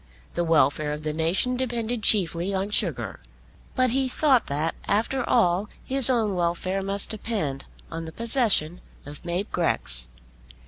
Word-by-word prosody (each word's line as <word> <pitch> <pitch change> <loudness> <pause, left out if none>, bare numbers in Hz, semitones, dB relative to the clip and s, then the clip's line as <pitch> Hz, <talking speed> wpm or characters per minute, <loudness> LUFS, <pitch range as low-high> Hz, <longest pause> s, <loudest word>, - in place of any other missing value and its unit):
The 175 - 0
welfare 150 -2 +2
of 150 +1 -6
the 155 0 -2
nation 170 +11 +1
depended 240 -2 -2
chiefly 190 -2 +2
on 195 +2 -2
sugar. 135 - 0 0.6
But 255 -1 +3
he 265 +1 +1
thought 265 -2 +3
that, 150 +3 -1
after 230 +5 +1
all, 200 -3 +2 0.2
his 270 -1 +3
own 225 -5 +2
welfare 180 +2 -1
must 195 +2 +1
depend 195 -11 -3 0.3
on 165 0 -5
the 160 - -7
possession 220 - +1 0.2
of 145 +1 -10
Mab 180 +4 -3
Grex. 65 - -2
190 Hz, 145 wpm, -25 LUFS, 160-230 Hz, 0.6 s, But